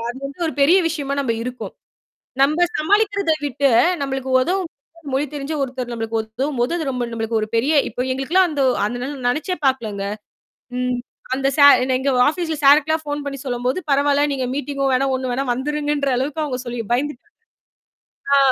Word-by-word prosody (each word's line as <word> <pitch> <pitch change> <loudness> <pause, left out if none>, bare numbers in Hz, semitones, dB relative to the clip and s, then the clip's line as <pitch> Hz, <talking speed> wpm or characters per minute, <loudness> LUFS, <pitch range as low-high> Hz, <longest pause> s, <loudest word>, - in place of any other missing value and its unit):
அது 265 - -10
வந்து 280 +5 -11
ஒரு 315 - -3
பெரிய 335 +7 +6
விஷயமா 285 -3 -3
நம்ப 245 -4 0
இருக்கோம். 250 +1 -6 0.7
நம்ப 305 +5 +3 0.2
சமாளிக்கிறத 400 +1 +2
விட்டு 280 +1 +1 0.3
நம்மளுக்கு 265 -1 -3
உதவும் 360 +4 -1 0.4
மொழி 280 +2 +1
தெரிந்த 290 +2 -4
ஒருத்தர் 255 -2 -4
நம்மளுக்கு 225 -1 -2
உதவும்போது 245 +4 -2
அது 315 -5 -3
ரொம்ப 250 -2 -2
நமளுக்கு 225 0 -1
ஒரு 215 - -3
பெரிய 265 +7 +2 0.2
இப்ப 250 - -3
எங்களுக்கெல்லாம் 345 +8 +2
அந்த 290 -2 -3 0.3
அந்த 245 +4 -4 0.2
நினைச்சே 310 +8 -1
பாக்கல்லங்க. 215 -7 -1 0.7
ம் 250 -1 -1 0.4
அந்த 270 0 +1
சார் 285 0 +8 0.2
எங்க 270 - -2 0.2
ஆபீஸ்ல 320 -1 -2
சார்க்கு 290 +2 +6
எல்லாம் 315 -1 0
போன் 290 0 -3
பண்ணி 275 -2 -5
சொல்லும்போது 250 +4 -1
"பரவால்ல 285 +1 +3
நீங்க 260 -2 -2
மீட்டிங்கும் 275 -2 -1
வேணாம். 265 +1 +1
ஒண்ணும் 255 -1 -3
வேணாம் 265 -1 0
வந்துடுங்கன்ற" 290 +1 -1
அளவுக்கு 295 +4 -2
அவங்க 255 -4 -3
சொல்லி 240 0 -4
பயந்துட்டாங்க. 290 +9 -2 1.1
ஆ. - - +6
275 Hz, 160 wpm, -20 LUFS, 250-300 Hz, 1.1 s, சார்